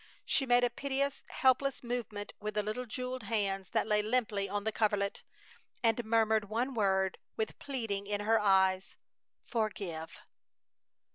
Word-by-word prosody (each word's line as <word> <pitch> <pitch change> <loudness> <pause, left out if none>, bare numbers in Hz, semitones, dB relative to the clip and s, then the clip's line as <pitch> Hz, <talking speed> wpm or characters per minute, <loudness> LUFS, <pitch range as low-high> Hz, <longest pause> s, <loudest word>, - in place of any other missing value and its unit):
She 270 - +2
made 245 0 +5
a 245 - +3
piteous, 275 +2 -1
helpless 265 +1 +2
movement 235 -4 -4
with 210 0 -4
the 210 - +1
little 215 +4 -3
jeweled 255 +2 -4
hands 200 -3 -1
that - - +1
lay 210 -1 +2
limply 215 -3 0
on 205 +1 -2
the 220 - 0
coverlet, 205 -2 0 0.6
and 230 +1 +3
murmured 220 -2 +2
one 245 +5 -1
word, 190 -4 +1 0.2
with 220 - -2
pleading 225 -8 -3
in 205 0 -1
her 220 +2 +3
eyes: 190 -2 +3 0.4
"Forgive!" 195 -8 -3
215 Hz, 145 wpm, -32 LUFS, 200-245 Hz, 0.6 s, made